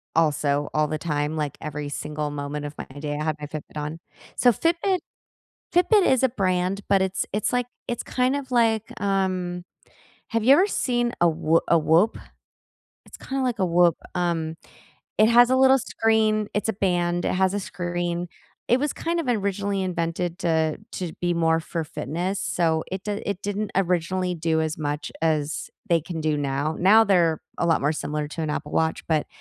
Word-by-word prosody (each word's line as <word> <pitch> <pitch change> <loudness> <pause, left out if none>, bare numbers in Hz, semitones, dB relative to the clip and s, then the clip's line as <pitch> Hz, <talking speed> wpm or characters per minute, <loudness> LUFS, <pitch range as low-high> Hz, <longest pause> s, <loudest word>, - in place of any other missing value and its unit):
also, 145 -2 +1
all 155 0 +2
the 155 - -2
time, 150 -1 -2
like 150 -3 -3
every 150 -1 -5
single 150 +1 -4
moment 145 0 -4
of 145 - -6
my - - -6
day, 145 0 -3
I - - -2
had 155 -1 0
my 150 - -5
Fitbit 150 +1 -8
on. 150 +2 -4 0.4
So, 245 - +5
Fitbit 345 - +1 0.8
Fitbit 365 +3 +5
is 260 -1 +3
a 260 - +5
brand, 190 -3 0
but 195 -1 +4
it's 190 0 -1
it's 210 0 0
like 245 -1 +1 0.2
it's 240 - -3
kind 255 +2 +1
of 265 -2 -6
like, 225 -3 +3 0.2
um, 185 -3 -1 0.6
have 230 -1 -1
you 265 - +7
ever 365 +7 +5
seen 240 -10 0
a 175 - +6
W 165 0 +3
a 170 - +5
Whoop? 165 +8 +3 0.9
It's - - -12
kinda 270 0 -3
like 245 -3 0
a 190 - +1
Whoop. 175 -1 +4 0.2
Um, 165 -2 -1 0.6
it 215 +1 +5
has 240 +1 +7
a 260 - +3
little 265 0 +6
screen, 220 -3 +1
it's 210 +2 -1
a - - +2
band, 175 -3 0
it - - +1
has 190 +1 +2
a 205 - -1
screen. 175 -1 -3 0.4
It 245 - +4
was 295 +2 -1
kind 335 +1 -2
of 330 - -2
originally 200 -3 0
invented 175 -1 -2
to 160 -3 +1
to 180 -3 -4
be 175 0 +1
more 165 -1 +2
for 165 +1 -4
fitness, 175 +5 -3
so, 160 -2 0
it 190 0 -4
d 210 0 -2
it 200 -2 -2
didn't 205 +1 -2
originally 180 0 0
do 160 -1 0
as 160 -1 -1
much 145 -1 -3
as 155 -2 0 0.2
they 170 -2 +3
can 165 +1 -6
do 155 -1 +1
now. 145 +2 -1
Now 205 +5 +6
they're 170 -6 +3 0.2
a - - +1
lot 165 - +3
more 145 +2 +1
similar 150 -1 -3
to 160 +2 -5
an 155 - -1
Apple - - -4
Watch, 160 0 0
but 155 -2 +1
175 Hz, 190 wpm, -24 LUFS, 160-210 Hz, 0.9 s, you